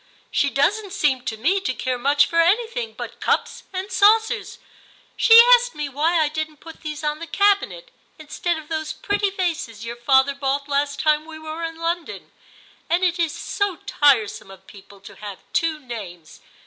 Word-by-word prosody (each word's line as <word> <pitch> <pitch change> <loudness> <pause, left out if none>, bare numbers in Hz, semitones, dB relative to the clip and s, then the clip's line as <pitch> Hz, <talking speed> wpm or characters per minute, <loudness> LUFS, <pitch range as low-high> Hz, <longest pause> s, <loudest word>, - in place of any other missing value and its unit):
* - - -32
She 280 - +1
doesn't 380 +9 0
seem 280 -10 0
to 220 - -3
me 355 - +1
to 260 -9 -2
care 255 -1 -3
much 285 +3 +3
for 335 0 +2
anything 455 +6 0
but - - -8
cups - - -1
and 380 +3 -5
saucers; 440 +2 +2 0.6
she 455 0 +7
asked 485 0 +3
me 300 -2 -4
why 315 +5 +1
I 310 - +2
didn't 310 0 -5
put 325 +2 -13
these 305 0 -6
on 300 0 -2
the 335 - -7
cabinet 410 +7 +1 0.3
instead 320 +2 -3
of 310 -1 -10
those 315 -1 -3
pretty 405 0 -1
vases 330 - -3
your 235 +1 -5
father 265 +3 +3
bought 275 0 -2
last 285 0 -1
time 305 0 +2
we 320 -1 -9
were 315 +1 -7
in 325 0 -5
London; 335 0 -4 0.6
and 345 +2 +1
it 355 -1 +1
is 330 -3 +1
so 405 +5 -2
tire 280 -8 +3
some 195 - -10
of 190 0 -14
people 200 0 -16
to 195 - -13
have 205 -2 -9
two 320 -2 0
names. 195 - -9
310 Hz, 185 wpm, -22 LUFS, 275-370 Hz, 0.6 s, she